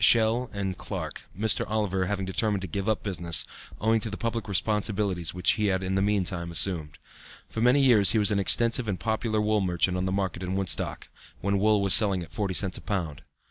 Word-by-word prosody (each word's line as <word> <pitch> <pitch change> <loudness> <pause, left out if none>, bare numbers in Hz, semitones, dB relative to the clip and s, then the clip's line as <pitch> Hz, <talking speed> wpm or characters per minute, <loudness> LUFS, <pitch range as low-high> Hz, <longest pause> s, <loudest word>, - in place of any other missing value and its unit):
Schell 115 +2 +4
and 95 -2 -4
Clarke, - - -7
Mr. 110 0 +1
Oliver 100 -4 -1
having 100 -1 -3
determined 100 +1 0
to - - -4
give 100 +5 -3
up 110 - -1
business, 85 -4 0 0.3
owing 110 +2 +2
to 110 - -5
the 105 - -6
public 115 -1 -3
responsibilities 100 -3 -1
which 90 -2 +2
he 105 -1 -1
had 95 -1 -1
in 95 0 -3
the 95 - +1
meantime 95 -4 -1
assumed. 85 -4 0 0.5
For 110 - -5
many 125 +4 +4
years 110 -7 +6
he - - +1
was 105 -1 +3
an 100 - +1
extensive 115 +4 +3
and 95 -3 -3
popular 110 -1 -1
wool 105 0 +1
merchant 90 0 0
on 90 - -2
the 95 - -2
market 95 -2 -3
in 90 +1 -3
Woodstock, 95 -6 -2 0.3
when 100 0 0
wool 105 0 +2
was 100 -2 +4
selling 100 -5 +5
at - - -14
forty 100 -3 -2
cents 95 -1 +2
a - - -15
pound. 85 -8 -4
100 Hz, 215 wpm, -26 LUFS, 95-110 Hz, 0.5 s, years